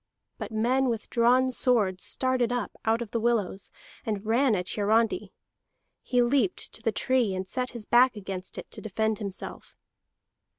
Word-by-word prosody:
But - - -5
men 250 +4 +2
with 225 -2 -4
drawn 250 +2 +4
swords 215 -8 +1
started 255 -2 +1
up 245 -3 -2
out 225 +1 +2
of 215 - -12
the 230 - 0
willows, 220 -4 0 0.3
and 210 -2 -3
ran 235 +2 +3
at 180 -1 -2
Hiarandi. 225 - +1 0.7
He 245 -1 +2
leaped 240 -6 +1
to - - -5
the 225 - +1
tree, 240 -3 +1
and 185 0 -4
set 255 +4 -2
his 235 -3 -8
back 245 +2 +5
against 190 -2 -6
it - - -8
to - - -6
defend 220 +1 -1
himself. 200 -3 -7
230 Hz, 165 wpm, -27 LUFS, 205-245 Hz, 0.7 s, back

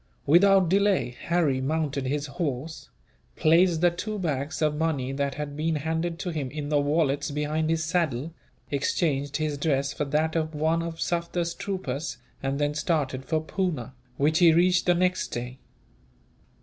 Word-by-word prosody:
Without 190 +4 +5
delay, 195 -8 +2
Harry 160 -7 +1
mounted 145 -1 -1
his 145 +2 -1
horse, 145 0 -4 0.5
placed 165 +1 +4
the 175 -1 +5
two 210 +5 -4
bags 150 -6 -2
of 150 -1 +2
money 150 -5 -1
that 140 0 -2
had 145 -1 -5
been 160 +2 0
handed 160 +3 -2
to 180 - -3
him 145 -5 -3
in 145 +1 -5
the 145 -1 +3
wallets 145 -1 +1
behind 150 +2 -1
his 165 -1 +1
saddle, 160 -3 -1 0.4
exchanged 145 0 0
his 155 -2 -2
dress 140 -2 0
for 150 - -2
that 155 +3 0
of 160 -1 -1
one 160 +2 +1
of 165 -1 -5
Sufder's 170 0 -1
troopers, 150 -8 -4 0.2
and 135 0 -1
then 145 0 0
started 150 -4 -1
for 155 +3 0
Poona, 155 - -2 0.2
which 155 +3 +2
he 170 -2 +7
reached 175 +2 +3
the 175 - +5
next 180 +1 +1
day. 125 +2 -6
155 Hz, 160 wpm, -26 LUFS, 140-170 Hz, 0.5 s, he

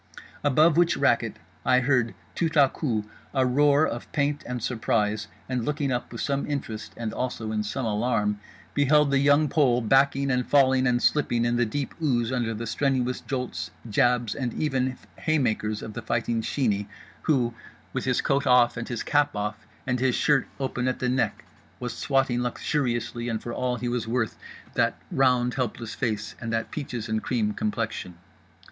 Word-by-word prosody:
Above 150 +3 +4
which 175 -1 +4
racket - - +2 0.3
I 125 0 +4
heard 125 -3 +1 0.2
tout 165 - 0
à 140 -3 +5
coup 115 -9 -1 0.3
a 130 -1 +3
roar 145 +4 +4
of 120 - -5
pain 145 -1 0
and 125 -2 -4
surprise; 110 -3 0 0.2
and 125 -2 -1
looking 145 0 -1
up 125 -1 -2
with 115 - -5
some 140 0 -1
interest 115 -7 -4
and 115 -2 -3
also 115 -3 -3
in 110 -1 0
some 105 +4 -3
alarm, 105 -1 0 0.3
beheld 145 0 +4
The 135 - +4
Young 145 +2 +4
Pole 130 -5 +3
backing 135 +3 +3
and 125 0 0
filling 130 -2 +4
and 120 -1 +1
slipping 120 -6 +2
in 120 0 +1
the 120 -1 +2
deep 140 +5 -3
ooze 120 -6 +1
under 120 -3 -1
the 115 +2 -4
strenuous 125 +1 0
jolts, 125 -2 -4 0.2
jabs 120 0 +2
and 125 -4 -3
even 130 -4 0 0.2
haymakers 115 -9 0
of 110 - -7
The 120 - -5
Fighting 115 0 -1
Sheeney, 105 -5 0 0.3
who, 125 -6 +1 0.4
with - - -2
his - - +2
coat 140 0 +1
off 125 -1 +5
and 115 - -4
his 120 -2 -3
cap 145 -5 +2
off 105 +1 -4 0.2
and 125 -1 0
his 130 -1 +2
shirt 150 -2 +2
open 130 -2 -1
at 130 - 0
the 125 - -1
neck, 130 +1 0 0.3
was 125 -1 -4
swatting 135 -3 +1
luxuriously 120 -2 -1
and 115 -1 -1
for 120 - -6
all 125 0 -1
he 125 - -4
was 120 -2 -2
worth 115 -1 0 0.4
that - - +1
round 125 -2 +3
helpless 120 -3 -3
face 110 -4 -2
and 115 -1 -3
that 115 0 -2
peaches 125 -7 -4
and 110 0 -1
cream 110 -4 0
complexion. 105 -5 -3
125 Hz, 180 wpm, -26 LUFS, 115-135 Hz, 0.4 s, à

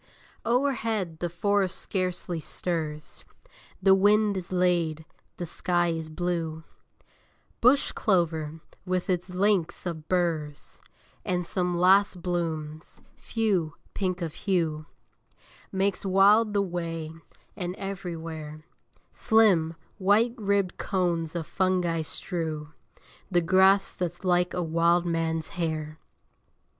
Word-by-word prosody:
O'erhead 225 - 0
the 175 - -2
forest 190 +2 0
scarcely 180 -2 -3
stirs: 155 -2 -4 0.6
The 195 0 +7
wind 205 +1 +4
is 185 -2 -5
laid: 170 -4 +1 0.3
the 175 - -3
sky 175 +1 +1
is 165 -1 -3
blue: 165 -1 -3 1.0
Bush 255 +4 +4
clover, 160 -6 0 0.2
with 185 0 -1
its 180 +1 -2
links 185 -2 +1
of 160 -3 -5
burrs, 160 -5 -2 0.4
And 180 -3 -1
some 180 0 -1
last 190 +1 +4
blooms, 160 -3 -3 0.2
few, 195 -9 -1 0.2
pink 185 -2 -2
of 160 -2 -4
hue, 165 -5 -1 0.8
Makes 195 0 0
wild 205 +3 +4
the 200 - +3
way: 165 -3 -4 0.4
and 180 0 -4
everywhere 165 -6 -6 0.5
Slim, 190 -8 +3 0.2
white 210 +5 +3
ribbed 200 -5 0
cones 175 -4 -1
of 165 -2 -2
fungi 180 -3 0
strew 155 -2 -3 0.6
The 175 -2 +3
grass 190 +3 +4
that's 175 0 -4
like 180 0 +2
a 180 - 0
wildman's 165 -1 +1
hair. 155 -3 -3
175 Hz, 105 wpm, -27 LUFS, 165-190 Hz, 1.0 s, The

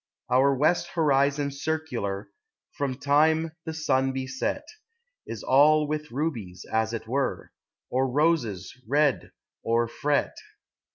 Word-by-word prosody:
Our 135 +2 +4
west 155 +6 +2
horizon 140 -2 +2
circular, 140 -9 -3 0.5
From 135 -2 -2
time 155 +3 +2
the 160 - -4
sun 135 -4 +1
be 130 0 -3
set, 130 0 -3 0.6
Is - - -6
all 150 +3 +5
with 150 0 -3
rubies, 115 - -4
as 110 0 +1
it 115 -1 -5
were, 135 +3 -2 0.4
Or 130 +1 +1
roses 145 - 0
red 145 +1 +2 0.3
o'erfret. 120 +5 0
140 Hz, 115 wpm, -26 LUFS, 125-150 Hz, 0.6 s, all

